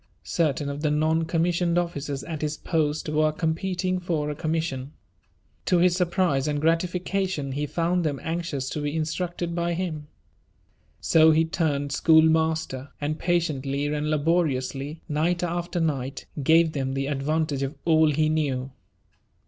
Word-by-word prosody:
Certain 150 -4 0
of 140 +1 -4
the 150 - +1
non 155 +2 +1
commissioned 170 +1 +1
officers 145 -5 -2
at 160 -3 -5
his 150 0 -2
post 155 -2 -1
were 155 0 +2
competing 180 +3 -1
for 160 -4 -1
a - - -5
commission. 155 -4 -2 0.7
To 180 - +4
his 175 0 +4
surprise 175 -6 +1
and 145 -1 0
gratification, 175 -1 0
he 145 +2 -2
found 170 +4 0
them 145 -4 -1
anxious 160 -5 -3
to 150 - -3
be 145 +1 -2
instructed 170 +2 -2
by 170 0 -1
him. 160 -5 -4 0.9
So 160 -1 +5
he 160 +1 +4
turned 145 -4 -1
schoolmaster, 160 -3 +3
and 150 +2 -2
patiently 145 -5 0
and 150 0 -1
laboriously, 150 -2 0
night 170 +3 0
after 175 +1 -2
night, 140 -4 -2 0.2
gave 160 +3 +4
them 135 -3 -2
the 135 0 -1
advantage 145 +1 -1
of 135 +1 -3
all 160 -2 +5
he 155 +1 +2
knew. 140 -4 -1
155 Hz, 145 wpm, -25 LUFS, 145-170 Hz, 0.9 s, So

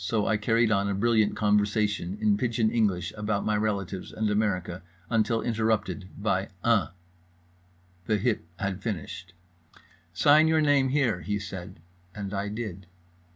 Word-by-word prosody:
—so 105 +3 0
I 110 - +2
carried 115 +2 +2
on 100 -1 +2
a 100 - -1
brilliant 110 0 +2
conversation 105 -2 +1
in 105 -1 +3
pidgeon 115 0 0
English 95 -7 0
about 105 -1 -2
my 105 - +1
relatives 100 -3 -2
and 110 -1 -1
America 95 -4 -1 0.3
until 115 0 +1
interrupted 110 -4 -1
by 100 -2 -1
"Uh." 115 -4 +3 1.2
The 110 - +2
hip 105 -5 -1
had 95 -1 -3
finished. 95 -2 -5 0.8
"Sign 145 - +5
your 160 0 +3
name, 145 -3 +3
here," 125 -10 +1
he 105 +4 -2
said, 95 -3 -8 0.3
and 100 -1 -5
I 100 +1 -2
did. 100 -4 -6
105 Hz, 145 wpm, -27 LUFS, 100-115 Hz, 1.2 s, Sign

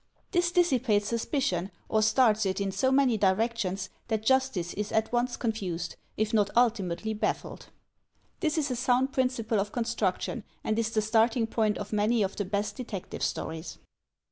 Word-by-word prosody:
This 350 -2 +2
dissipates 255 - +2
suspicion, 225 - -1 0.2
or 215 - +2
starts 220 0 +4
it 190 +1 -1
in 200 -1 -1
so 260 +7 +1
many 265 -4 +4
directions 195 -1 0 0.2
that 220 -1 -1
justice 260 -9 +1
is 210 +1 -3
at 220 0 +1
once 245 +1 0
confused, 185 -7 -3 0.2
if 215 +1 0
not 205 -2 +3
ultimately 220 -3 +1
baffled. 210 - -3 0.7
This 315 -2 0
is 295 -3 0
a - - 0
sound 255 +2 +1
principle 245 -5 0
of 200 +1 -2
construction, 230 -2 -1 0.2
and 215 +1 0
is 225 -1 +1
the 220 -1 0
starting 225 +2 +3
point 220 -2 0
of 205 +1 -6
many 215 +2 +2
of 195 - -2
the 205 - -2
best 205 +2 -2
detective 225 -7 -6
stories. 160 +1 -3
220 Hz, 165 wpm, -28 LUFS, 205-245 Hz, 0.7 s, starts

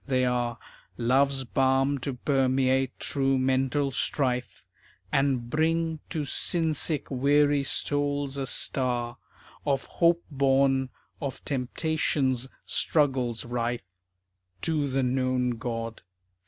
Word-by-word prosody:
They 130 -2 +2
are 120 -1 -1 0.4
Love's 135 +3 +2
balm 135 +2 +1
to 130 0 -4
permeate 130 0 +1
true 135 -1 +1
mental 135 +2 +1
strife, 125 -2 -1 0.5
And 135 -4 +1
bring 160 +3 0
to 155 -3 -2
sin 160 +3 +2
sick 150 0 0
weary 145 +2 +3
souls 145 0 -1
a 135 - -2
star 120 -2 0 0.5
Of 140 -2 0
hope 170 0 +2
born 135 -1 +2 0.3
of 140 -2 -5
temptation's 135 -1 0 0.2
struggles 130 -7 +1
rife. 120 -1 -2 0.8
_To 150 -4 0
the 135 0 +1
Known 130 0 +1
God. 115 -2 -4
135 Hz, 105 wpm, -27 LUFS, 125-145 Hz, 0.8 s, weary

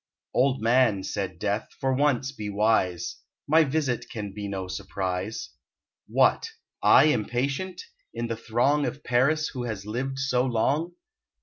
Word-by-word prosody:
"Old 130 -2 +2
man," 115 -4 +3
said 95 -4 -3
Death, 105 +4 -2
"for 135 -1 +1
once 135 -1 +1
be 105 -6 -6
wise; 100 -4 +1 0.3
My 160 +3 +6
visit 140 -4 -1
can 105 -3 -6
be 100 0 -5
no 95 -2 -4
surprise. 95 +3 -4 0.6
What! 455 - +3 0.3
I - - +7
impatient? 140 - 0 0.3
In 115 0 -3
the 115 -1 -2
throng 120 +6 +1
Of 145 - -6
Paris 140 +6 +2
who 125 -2 -5
has 105 -4 -5
lived 130 +5 -3
so 130 -2 +1
long? 135 +8 0
120 Hz, 140 wpm, -26 LUFS, 105-135 Hz, 0.6 s, I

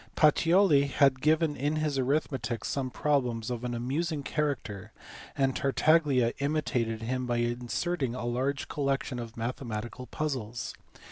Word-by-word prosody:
Pacioli 165 -1 +5
had 135 -1 +3
given 155 0 +3
in 145 +4 -1
his 155 -3 0
arithmetic 130 -3 -1
some 135 -2 -1
problems 125 -5 0
of 120 -1 -4
an 120 -1 -2
amusing 145 +6 -2
character, 135 - -2 0.5
and 135 -1 +2
Tartaglia 140 -4 +3
imitated 125 -6 -1
him 125 +2 -2
by 120 -1 0
inserting 120 +4 -1
a 125 - -4
large 130 +4 -1
collection 135 -3 -1
of 115 -1 -7
mathematical 120 0 -4
pu/zles. 125 -7 -3
130 Hz, 130 wpm, -29 LUFS, 120-150 Hz, 0.5 s, Pacioli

